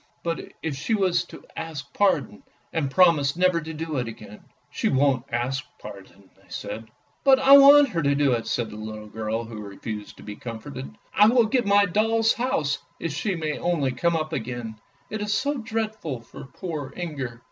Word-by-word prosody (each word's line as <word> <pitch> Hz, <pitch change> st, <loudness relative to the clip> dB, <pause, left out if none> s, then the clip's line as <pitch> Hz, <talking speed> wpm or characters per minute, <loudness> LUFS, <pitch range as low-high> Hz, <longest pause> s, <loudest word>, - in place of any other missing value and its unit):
" -, -, -41 dB
But 165 Hz, -1 st, -4 dB
if 160 Hz, -3 st, -2 dB
she 165 Hz, +11 st, 0 dB
was 180 Hz, -4 st, +1 dB
to -, -, -13 dB
ask 160 Hz, -4 st, -6 dB
pardon, 140 Hz, -, +1 dB, 0.3 s
and 150 Hz, -4 st, 0 dB
promise 150 Hz, -3 st, +4 dB
never 180 Hz, -1 st, +2 dB
to 160 Hz, +1 st, -7 dB
do 160 Hz, -1 st, -4 dB
it 125 Hz, -2 st, -1 dB
again? 105 Hz, -2 st, -10 dB
" -, -, -41 dB
" -, -, -41 dB
She -, -, 0 dB
won't 135 Hz, -2 st, +2 dB
ask 125 Hz, +3 st, -1 dB
pardon," 100 Hz, -2 st, -12 dB
they -, -, -26 dB
said. 110 Hz, 0 st, -6 dB, 0.2 s
" -, -, -40 dB
But 270 Hz, -1 st, +7 dB
I 270 Hz, +1 st, +8 dB
want 285 Hz, +1 st, +8 dB
her 170 Hz, -7 st, -1 dB
to 140 Hz, -1 st, +2 dB
do 140 Hz, -1 st, +3 dB
it," 115 Hz, -2 st, -1 dB
said 120 Hz, -2 st, -1 dB
the 105 Hz, -, -8 dB
little 110 Hz, 0 st, -7 dB
girl 110 Hz, +1 st, -3 dB
who 115 Hz, -2 st, -8 dB
refused 105 Hz, +1 st, -7 dB
to -, -, -13 dB
be 105 Hz, -, -7 dB
comforted. 125 Hz, -, -7 dB, 0.2 s
" -, -, -36 dB
I 210 Hz, -, +6 dB
will 240 Hz, 0 st, +5 dB
give 240 Hz, 0 st, +1 dB
my 200 Hz, 0 st, +5 dB
doll's 225 Hz, +4 st, +2 dB
house 160 Hz, -, -1 dB, 0.2 s
if 165 Hz, -4 st, -3 dB
she 185 Hz, +6 st, -1 dB
may 155 Hz, -2 st, -3 dB
only 160 Hz, -7 st, 0 dB
come 170 Hz, +7 st, +1 dB
up 155 Hz, 0 st, -2 dB
again', 115 Hz, -3 st, -4 dB, 0.3 s
it 215 Hz, 0 st, -3 dB
is 205 Hz, -1 st, 0 dB
so 280 Hz, +5 st, 0 dB
dreadful 220 Hz, -, -3 dB
for 115 Hz, -, -11 dB
poor 150 Hz, -2 st, -6 dB
Inger." 140 Hz, -9 st, -5 dB
150 Hz, 210 wpm, -25 LUFS, 120-195 Hz, 0.3 s, I